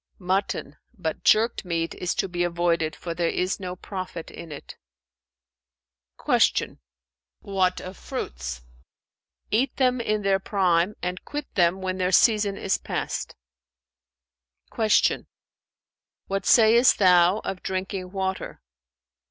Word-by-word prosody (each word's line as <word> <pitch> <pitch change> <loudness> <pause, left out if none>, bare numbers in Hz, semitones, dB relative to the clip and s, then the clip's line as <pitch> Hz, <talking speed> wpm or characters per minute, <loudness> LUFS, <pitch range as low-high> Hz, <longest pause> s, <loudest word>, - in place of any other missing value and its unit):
"Mutton; 185 -5 -2 0.2
but 160 -4 -4
jerked 225 +2 +3
meat 165 -2 -2
is 180 - -3
to - - 0
be 175 -1 -2
avoided, 170 -2 0
for 170 - -5
there 170 0 0
is 185 +1 -1
no 180 -1 -5
profit 185 -3 -7
in 170 -2 -10
it." 145 - -9 1.5
Q - - +2 0.6
"What 185 -2 0
of 185 +1 -9
fruits?" - - -6 0.9
"Eat 245 +4 +1
them 255 -2 +2
in 215 -2 -1
their 195 -1 +2
prime 185 -1 +1
and 180 +1 -3
quit 295 -1 -6
them 180 +1 +2
when 185 0 -2
their 180 0 +1
season 205 0 +4
is 190 - 0
past." - - -4 1.4
Q 220 -2 +2 1.0
"What 195 -1 -3
sayest 235 +2 +6
thou 180 0 +5
of 190 - -4
drinking 185 -1 -4
water?" 190 -1 -3
185 Hz, 120 wpm, -25 LUFS, 175-200 Hz, 1.5 s, sayest